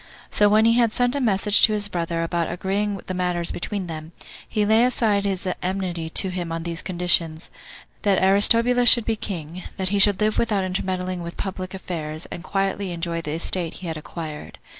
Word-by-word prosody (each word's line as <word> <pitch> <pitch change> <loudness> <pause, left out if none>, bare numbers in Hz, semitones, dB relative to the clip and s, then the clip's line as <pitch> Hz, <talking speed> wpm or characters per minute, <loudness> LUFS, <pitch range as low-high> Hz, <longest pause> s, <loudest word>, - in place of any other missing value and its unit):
So 205 0 +3
when 215 +2 +4
he 230 - +5
had 235 -2 +2
sent 245 -1 +1
a 285 - -2
message 210 -2 +2
to 215 - +6
his 205 -1 -1
brother 170 -3 -3
about 170 0 -2
agreeing 195 +3 -2
the 185 - -5
matters 180 -2 -1
between 195 +1 -4
them, 160 -1 -8 0.4
he 210 -1 0
laid 220 +3 +4
aside 215 -5 +1
his 190 -2 -2
enmity 180 -3 -3
to 190 +3 +2
him 175 -2 -5
on 165 0 -4
these 170 -1 -3
conditions, 170 -3 +1 0.5
that 200 -3 +2
Aristobulus 230 +6 +4
should 235 -3 +6
be 225 - 0
king, 175 -5 -6 0.2
that 190 -1 -1
he 200 +1 0
should 200 -1 +7
live 215 0 +1
without 210 -4 0
intermeddling 185 -1 -3
with 170 0 -8
public 185 -1 -5
affairs, 160 -4 -6
and 170 - -7
quietly 195 0 -2
enjoy 170 -1 -3
the 150 -2 -5
estate 170 +1 0
he 185 - -10
had 160 - -4
acquired. 155 0 -8
185 Hz, 195 wpm, -22 LUFS, 170-205 Hz, 0.5 s, should